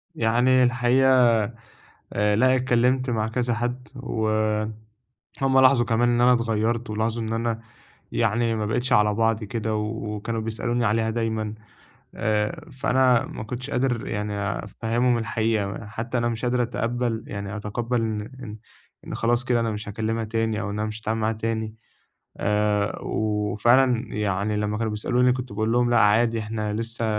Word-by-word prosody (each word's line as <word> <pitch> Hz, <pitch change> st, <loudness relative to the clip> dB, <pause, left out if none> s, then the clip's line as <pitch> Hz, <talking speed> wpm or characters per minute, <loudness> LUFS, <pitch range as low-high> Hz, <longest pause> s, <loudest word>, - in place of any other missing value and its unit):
يعني 125 Hz, +1 st, +3 dB
الحقيقة 125 Hz, +1 st, +4 dB, 0.9 s
آآ، 105 Hz, 0 st, +2 dB
لأ، 130 Hz, +3 st, +4 dB
اتكلّمت 130 Hz, +1 st, +2 dB
مع 110 Hz, -2 st, 0 dB
كذا 120 Hz, +1 st, -1 dB
حَد 120 Hz, +2 st, -3 dB
و 120 Hz, -4 st, -2 dB, 1.1 s
هُم 135 Hz, -1 st, +4 dB
لاحظوا 130 Hz, -2 st, +5 dB
كمان 120 Hz, +1 st, +2 dB
إن 120 Hz, 0 st, +2 dB
أنا 125 Hz, +1 st, +6 dB
اتغيّرت، 115 Hz, 0 st, 0 dB
ولاحظوا 110 Hz, +2 st, -1 dB
إن 110 Hz, -, -3 dB
أنا 115 Hz, 0 st, -1 dB, 0.5 s
يعني 115 Hz, +1 st, +1 dB
ما 110 Hz, -1 st, -2 dB
بقيتش 120 Hz, +4 st, 0 dB
على 105 Hz, -3 st, +4 dB
بعضي 115 Hz, 0 st, +1 dB
كده 110 Hz, +1 st, -2 dB
و 105 Hz, 0 st, -3 dB
وكانوا 110 Hz, +2 st, -3 dB
بيسألوني 115 Hz, +2 st, -1 dB
عليها 110 Hz, +2 st, +1 dB
دايمًا 110 Hz, -2 st, -2 dB, 0.6 s
آآ، 110 Hz, +8 st, -1 dB
فأنا 130 Hz, -2 st, +3 dB
ما -, -, -7 dB
كنتش 125 Hz, +5 st, -6 dB
قادر 125 Hz, -3 st, 0 dB
يعني 105 Hz, 0 st, -3 dB, 0.3 s
أفهّمهم 120 Hz, +3 st, 0 dB
الحقيقة، 110 Hz, -2 st, -1 dB
حتى 115 Hz, +4 st, -3 dB
أنا 120 Hz, 0 st, +1 dB
مش 115 Hz, +1 st, -3 dB
قادر 125 Hz, 0 st, +1 dB
أتقبّل 120 Hz, -1 st, -2 dB
يعني 100 Hz, 0 st, -5 dB
أتقبّل 115 Hz, +4 st, -2 dB
إن 110 Hz, -2 st, -1 dB, 0.2 s
إن 105 Hz, -4 st, -7 dB, 0.5 s
إن -, -, -5 dB
خلاص 120 Hz, +2 st, +1 dB
كده 120 Hz, -2 st, +2 dB
أنا 115 Hz, -, 0 dB
مش 105 Hz, -1 st, -5 dB
هاكلّمها 110 Hz, +2 st, -2 dB
تاني 110 Hz, 0 st, -1 dB
أو 100 Hz, -, -3 dB
إن 105 Hz, -, -4 dB
أنا 110 Hz, 0 st, -1 dB
مش 110 Hz, +1 st, -7 dB
هاتعامل 110 Hz, 0 st, -2 dB
معاها 110 Hz, +1 st, +1 dB
تاني 110 Hz, 0 st, -3 dB, 0.6 s
آآ، 105 Hz, 0 st, 0 dB
وفعلًا 115 Hz, +4 st, +1 dB
يعني 105 Hz, 0 st, -1 dB
لمّا 105 Hz, 0 st, -1 dB
كانوا 110 Hz, -1 st, -1 dB
بيسألوني 125 Hz, +4 st, +2 dB
كنت 125 Hz, -2 st, -5 dB
باقول 110 Hz, +2 st, 0 dB
لهم 120 Hz, 0 st, +2 dB
لأ 120 Hz, -, +4 dB
عادي، 115 Hz, +2 st, +3 dB
إحنا 110 Hz, -1 st, -3 dB
لسه 115 Hz, +1 st, -3 dB
115 Hz, 160 wpm, -24 LUFS, 110-120 Hz, 1.1 s, أنا